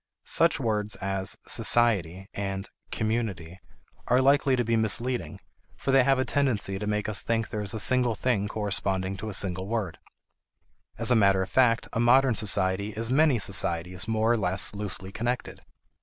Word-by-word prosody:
Such 165 -2 +2
words 105 -4 -1
as 95 -1 -2
"society" 95 -6 +3
and 95 -1 -4 0.2
"community" 105 -6 -3 0.5
are 125 - +3
likely 140 0 +3
to 125 - 0
be 115 0 0
misleading, 110 -4 -1 0.4
for 135 - -2
they 135 -1 +5
have 135 +1 +2
a 130 - 0
tendency 110 -9 -1
to 105 - -5
make 105 0 -2
us 105 -2 0
think 115 -1 -2
there 105 - -4
is 100 +1 -2
a - - -2
single 125 0 +2
thing 105 -3 -1
corresponding 100 -2 -3
to 105 +4 -7
the 105 - -5
single 95 -1 -1
word. 105 -6 -4 1.0
As 115 +2 +1
a - - +5
matter 100 -3 +3
of 95 - -9
fact, 120 -3 +2
a - - -2
modern 125 +2 +4
society 100 -1 +1
is 115 +3 -2
many 145 -1 +3
societies 90 -2 0
more 110 0 +1
or 120 - +2
less 95 -1 +1
loosely 95 -2 -5
connected. 120 +4 -4
105 Hz, 170 wpm, -26 LUFS, 95-120 Hz, 1.0 s, they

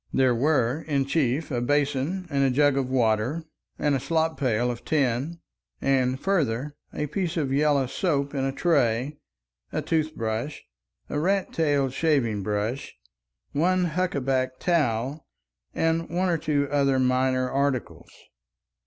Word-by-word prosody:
There 130 -2 +3
were, 135 +1 +1
in 140 -3 +1
chief, 140 +1 0
a 120 -2 0
basin 145 +6 0
and 140 -1 +2
a 135 - +4
jug 145 +2 +3
of 135 -2 -1
water 120 +4 +1 0.3
and 150 - +1
a 135 - +1
slop 160 +3 0
pail 125 -2 +1
of 120 - -8
tin, 145 +3 0 0.4
and, 130 -1 +1
further, 145 -8 0 0.2
a 150 - -2
piece 170 +3 -2
of 140 -4 0
yellow 145 -1 +3
soap 140 0 -1
in 135 -2 -1
a 135 - 0
tray, 135 -2 +1 0.5
a - - -2
tooth 155 -1 0
brush, 115 +6 -3 0.4
a 145 - -2
rat 195 +4 0
tailed 145 -5 +1
shaving 130 -9 +1
brush, 105 +6 -3 0.6
one 180 +4 +2
huckaback 135 -7 0
towel, 145 -4 0 0.5
and 165 0 0
one 180 +2 0
or 170 - +2
two 145 -2 0
other 140 -2 +2
minor 130 0 +2
articles. 140 -3 -1
140 Hz, 145 wpm, -26 LUFS, 130-155 Hz, 0.6 s, a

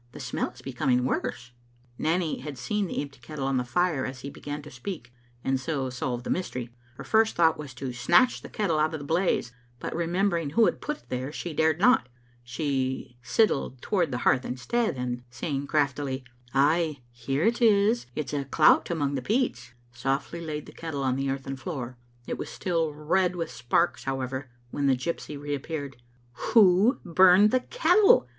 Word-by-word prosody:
The - - -9
smell - - -2
is - - -16
becoming 125 -1 +1
worse." 125 -1 -2 0.5
Nanny 165 0 0
had 140 +1 -7
seen 205 +9 -1
the 160 - -2
empty 140 -3 -11
kettle 135 +3 -5
on 135 -1 +1
the 125 - +1
fire 150 +2 +1
as 130 -1 -5
he 140 - -6
began 145 +1 -6
to 150 - -11
speak, 125 -2 -7 0.3
and 135 0 +1
so 135 -2 -2
solved 125 -1 -3
the - - -3
mystery. 125 -10 -3 0.2
Her - - -8
first 220 0 +3
thought 160 -1 +4
was 140 -4 -8
to 130 0 -5
snatch 135 - +3
the - - -10
kettle 180 -8 0
out 155 +1 +1
of - - -5
the 145 - -8
blaze, 165 -6 +1 0.3
but - - -5
remembering 170 -1 0
who 225 +10 +4
had - - 0
put 300 0 -3
it - - -31
there, 130 +2 -3
she 170 +1 -5
dared 160 +1 +2
not. 215 - +4 0.3
She 130 -1 -2
sidled 135 - +1
toward 175 - 0
the 125 - -2
hearth 130 - +4
instead, 215 - -1
and 125 -1 -3
saying 140 +2 -3
craftily, 140 -3 0 0.3
"Ay, 150 +1 +2
here 135 +5 -2
it 235 +4 +2
is; 215 - +4
it's 150 -3 -3
a 140 -1 -1
clout 150 +3 +4
among 145 -5 0
the 135 - -1
peats," 130 - -1 0.2
softly 135 +7 -2
laid 150 -2 -4
the - - -11
kettle 150 -4 -5
on 130 -1 +1
the 135 0 -1
earthen 135 0 -3
floor. 130 -5 -5 0.3
It - - -4
was - - -4
still 165 -4 -1
red 175 +5 +1
with 165 -2 -3
sparks, 120 -1 0
however, 130 0 -3 0.2
when 140 -1 0
the 135 - +4
gypsy 150 +1 -4
reappeared. 145 -1 -4 0.6
"Who 205 +3 +6
burned 185 +4 +6
the 255 - +3
kettle?" 425 - +4
145 Hz, 185 wpm, -27 LUFS, 130-175 Hz, 0.6 s, Who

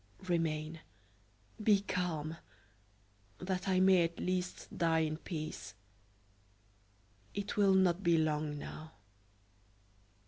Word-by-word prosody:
Remain; 160 -2 -1 0.8
be 210 -2 +4
calm, 165 -5 -2 1.0
that 185 +1 -3
I 185 -1 +3
may 190 -1 +6
at 165 0 -3
least 185 0 -3
die 165 -1 +2
in 155 -1 -1
peace. 155 - -6 1.6
It 200 +1 -3
will 200 -2 +5
not 185 -1 +3
be 170 -3 +4
long 150 -1 0
now." 155 +2 -8
170 Hz, 100 wpm, -34 LUFS, 155-185 Hz, 1.6 s, may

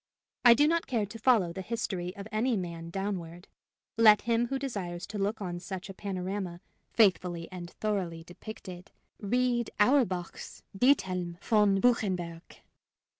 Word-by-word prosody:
I 240 -2 +9
do 295 +5 +4
not 335 +1 +1
care 230 -5 0
to 220 +3 -10
follow 215 -8 +3
the 190 - -5
history 185 -4 -3
of 200 +1 -8
any 225 +2 +1
man 170 -2 -5
downward. 180 -2 -4 0.5
Let 215 -2 +7
him 235 +2 +1
who 270 - -2
desires 195 -10 -4
to 210 0 -6
look 205 +2 -1
on 175 -2 -4
such 190 +1 -7
a - - -10
panorama, 185 -2 -4 0.3
faithfully 180 -5 +2
and 175 -2 -7
thoroughly 180 -6 -3
depicted, 180 0 -10 0.3
read 240 +2 0
Auerbach's 210 -7 +1
"Diethelm 185 -8 +2
von 205 -2 +3
Buchenberg." 180 -8 -1
195 Hz, 140 wpm, -29 LUFS, 175-225 Hz, 0.5 s, I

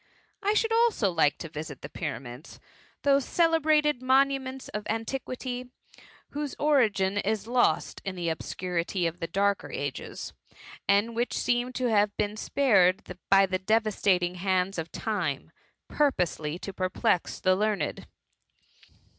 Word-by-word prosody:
I 415 +1 +1
should 450 +1 +2
also 455 - +3
like 160 -4 +2
to 165 - -6
visit 150 -3 -7
the - - -4
pyramids, 120 +4 -7 0.4
those 280 -1 +4
celebrated 310 -4 +2
monuments 265 0 +1
of 210 0 -5
antiquity, 250 +2 -4 0.6
whose 295 -1 -4
origin 210 -10 +2
is 210 0 -1
lost 245 +1 +1
in 195 -1 -4
the 175 -2 -2
obscu 180 +3 -5
rity 175 +1 0
of 165 +1 -5
the 165 - -3
darker 200 +2 0
ages, 140 -1 -5 0.5
and 205 +4 +2
which 240 +1 -1
seem 245 +1 0
to 255 0 -2
have 205 -1 +2
been 210 0 -1
spared 195 -8 +2
by 195 0 +6
the 185 -1 -2
devastating 195 -4 +1
hand 185 -1 0
of 160 0 -5
Time, 180 - -3 0.4
purposely 175 - 0
to 195 +2 -7
perplex 185 +1 0
the 185 0 +3
learned. 205 -5 -1
205 Hz, 135 wpm, -28 LUFS, 180-255 Hz, 0.6 s, by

